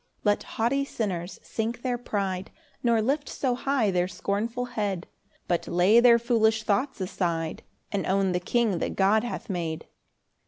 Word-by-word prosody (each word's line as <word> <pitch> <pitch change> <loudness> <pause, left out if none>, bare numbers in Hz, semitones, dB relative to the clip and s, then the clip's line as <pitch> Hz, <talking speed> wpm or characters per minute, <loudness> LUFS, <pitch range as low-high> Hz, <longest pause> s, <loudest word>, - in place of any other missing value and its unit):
4 210 - +5
Let 205 - -1
haughty 245 +5 0
sinners 190 -9 -3
sink 230 +2 -3
their 250 -2 -1
pride, 195 -5 -2 0.3
Nor 230 -2 +3
lift 285 +5 0
so 260 -3 0
high 250 -4 +1
their 180 -1 +1
scornful 225 +6 -2
head; 205 -7 -2 0.4
But 175 -1 0
lay 185 +6 +5
their 235 -1 +7
foolish 225 -2 +2
thoughts 255 +6 0
aside, 170 -4 -2 0.3
And 200 -2 -1
own 195 0 +2
the 180 - +1
king 210 0 +1
that - - -2
God 205 +3 +3
hath 240 - -5
made. 170 -5 -3
215 Hz, 160 wpm, -27 LUFS, 185-240 Hz, 0.4 s, their